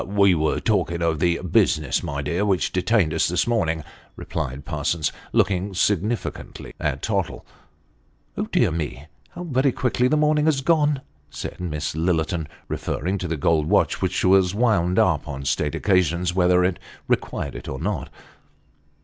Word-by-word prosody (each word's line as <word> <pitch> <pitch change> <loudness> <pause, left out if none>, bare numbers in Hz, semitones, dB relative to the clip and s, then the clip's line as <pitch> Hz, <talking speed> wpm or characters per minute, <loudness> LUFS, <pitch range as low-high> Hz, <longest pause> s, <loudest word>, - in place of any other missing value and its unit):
" - - -6 0.2
We 100 -2 +6
were 80 -2 +1
talking 85 -5 0
of 80 -2 +1
the 85 0 +2
business, 75 -3 +2
my 70 0 -4
dear, 85 +7 -1
which 100 -3 +1
detained 90 -3 +2
us 80 - +2
this 90 +1 +1
morning," 85 -10 0 0.3
replied 70 -3 -5
Parsons, 75 +1 -1 0.2
looking 95 +1 +1
significantly 105 +4 -2
at 75 -2 -2
Tottle. 100 -6 -2 0.5
" - - -9
Dear - - +3
me! 75 -3 -4 0.2
how 175 - -8
very 135 -4 +1
quickly 125 0 +1
the 155 +4 +2
morning 150 0 +3
has 150 -4 +2
gone," 150 -2 +2 0.3
said - - -7
Miss 75 -4 -3
Lillerton, 80 0 0 0.2
referring 95 +6 -2
to 90 - -3
the 80 -1 -2
gold 75 +1 +2
watch, - - +2
which 95 0 0
was 95 0 +4
wound 100 -6 +2
up 80 -6 +2
on 70 -2 -6
state 75 +2 0
occasions, 90 -2 +1
whether 90 0 +3
it 90 -1 0 0.3
required 70 - -1
it - - -7
or 65 - -4
not. - - -3
90 Hz, 160 wpm, -23 LUFS, 80-100 Hz, 0.5 s, We